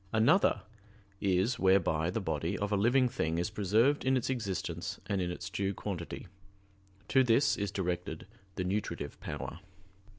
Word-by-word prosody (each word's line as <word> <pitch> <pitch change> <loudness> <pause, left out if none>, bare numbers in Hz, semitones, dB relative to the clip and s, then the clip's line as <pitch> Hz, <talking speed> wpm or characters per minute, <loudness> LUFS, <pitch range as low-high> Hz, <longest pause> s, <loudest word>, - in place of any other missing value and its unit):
Another 115 - +4 0.6
is 100 +6 +1
whereby 90 -4 +3
the 95 - -1
body 85 0 -2
of 100 +1 -2
a - - +3
living 125 +6 +4
thing 85 -10 -1
is 90 +5 -1
preserved 110 +8 +2
in 130 0 +3
its 130 - -1
existence 95 -6 -3
and 100 -2 -1
in 90 - -1
its 90 0 -5
due 100 +1 -2
quantity; 90 -5 -5 0.8
to 135 -1 +4
this 125 +4 +4
is 100 -1 -2
directed 90 -3 -3 0.3
the 90 - -1
nutritive 95 -6 -3
power. - - -6
100 Hz, 155 wpm, -31 LUFS, 90-115 Hz, 0.8 s, Another